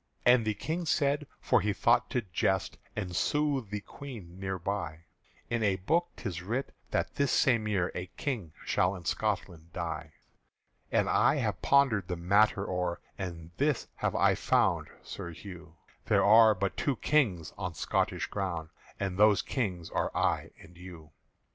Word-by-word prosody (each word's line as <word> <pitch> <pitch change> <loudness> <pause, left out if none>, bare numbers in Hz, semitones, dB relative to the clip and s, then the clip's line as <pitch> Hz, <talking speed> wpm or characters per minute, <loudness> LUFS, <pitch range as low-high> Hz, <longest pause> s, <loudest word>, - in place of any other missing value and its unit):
And 120 -2 +6
the 110 -1 0
King 165 - -3
said 145 -1 +1
(for - - +3
he 105 +2 0
thought 120 +4 +3
to 125 -3 -1
jest 90 -4 -1 0.2
And 95 -5 -4
soothe 145 - +1
the 105 0 -4
Queen 100 -7 -10
thereby), 95 -3 -3 0.5
"In 115 -1 -1
a 100 -3 +3
book 160 - +1
'tis 90 -6 -5
writ 115 +9 -3 0.2
that - - -1
this 140 -1 +2
same 115 -5 +3
year 95 -4 0
A 90 0 -4
King 115 - -3
shall 90 +2 +2
in 90 -3 -10
Scotland 85 +1 -2
die. 85 -4 -4 0.8
"And - - +2
I - - +4
have - - -1
pondered 130 -9 +3
the 90 - -2
matter 100 +3 +3
o'er, 90 -1 -1 0.2
And 85 -3 -6
this 145 -2 0
have - - -1
I - - +4
found, - - +2 0.2
Sir 85 - -7
Hugh, 90 -2 -11 0.3
There - - +4
are 110 +1 +7
but 100 +1 -2
two 140 - 0
Kings 110 - +1
on - - -4
Scotish - - 0
ground, 85 -5 -3 0.3
And 95 -1 -2
those 105 -2 +5
Kings 95 -10 -3
are - - 0
I - - +1
and 85 - -15
you. 85 -4 -11
100 Hz, 160 wpm, -30 LUFS, 90-120 Hz, 0.8 s, are